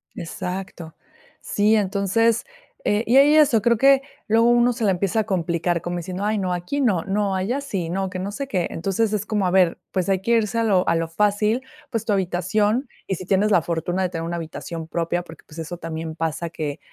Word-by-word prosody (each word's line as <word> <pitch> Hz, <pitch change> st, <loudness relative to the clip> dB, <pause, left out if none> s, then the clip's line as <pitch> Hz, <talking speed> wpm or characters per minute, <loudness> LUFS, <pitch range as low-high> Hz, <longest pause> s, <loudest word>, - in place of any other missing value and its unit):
Exacto. 180 Hz, -1 st, -6 dB, 0.4 s
Sí, 210 Hz, +2 st, +2 dB
entonces, 210 Hz, +3 st, +1 dB, 0.4 s
eh, 205 Hz, +2 st, +1 dB
y 240 Hz, -, +3 dB
hay 290 Hz, +2 st, +6 dB
eso, 275 Hz, -8 st, +5 dB
creo 235 Hz, 0 st, +3 dB
que 275 Hz, +2 st, +5 dB, 0.3 s
luego 230 Hz, +2 st, +4 dB
uno 240 Hz, 0 st, +4 dB
se 230 Hz, -1 st, -4 dB
la 200 Hz, -, +4 dB
empieza 195 Hz, +4 st, 0 dB
a -, -, -2 dB
complicar, 170 Hz, -3 st, -1 dB
como 175 Hz, 0 st, -3 dB
diciendo, 185 Hz, +3 st, -4 dB
ay, 215 Hz, 0 st, +1 dB
no, 185 Hz, -2 st, -1 dB
aquí 180 Hz, +12 st, -2 dB
no, 200 Hz, -10 st, +2 dB
no, 200 Hz, 0 st, 0 dB
allá 230 Hz, +9 st, -1 dB
sí, 190 Hz, -11 st, -3 dB
no, 190 Hz, +1 st, -1 dB
que 185 Hz, -, -5 dB
no 195 Hz, +2 st, -3 dB
sé 275 Hz, +6 st, -5 dB
qué. 185 Hz, -9 st, -1 dB
Entonces, 200 Hz, +5 st, -1 dB
es 210 Hz, -1 st, -1 dB
como, 210 Hz, -3 st, 0 dB
a 180 Hz, -, 0 dB
ver, 185 Hz, -3 st, +3 dB
pues, 185 Hz, 0 st, -1 dB
hay 190 Hz, -1 st, +1 dB
que 235 Hz, -, -1 dB
irse 230 Hz, -1 st, +2 dB
a -, -, +2 dB
lo 190 Hz, -4 st, +2 dB
a 165 Hz, -, +3 dB
lo 165 Hz, 0 st, 0 dB
fácil, 210 Hz, +7 st, +1 dB, 0.3 s
pues, 225 Hz, -2 st, -3 dB
tu 210 Hz, -, +1 dB
habitación 205 Hz, -, 0 dB, 0.2 s
y 190 Hz, -, -1 dB
si 185 Hz, -, -8 dB
tienes 200 Hz, +3 st, +2 dB
la 180 Hz, -, +5 dB
fortuna 170 Hz, +3 st, -2 dB
de 180 Hz, -, 0 dB
tener 165 Hz, -2 st, -4 dB
una 170 Hz, +1 st, -3 dB
habitación 165 Hz, 0 st, -6 dB
propia, 170 Hz, +1 st, -1 dB
porque, 165 Hz, -1 st, -14 dB
pues, 165 Hz, +1 st, -11 dB
eso 170 Hz, +2 st, -5 dB
también 160 Hz, -1 st, -5 dB
pasa 165 Hz, +1 st, -2 dB
que, 150 Hz, -3 st, -4 dB
190 Hz, 225 wpm, -23 LUFS, 175-215 Hz, 0.4 s, hay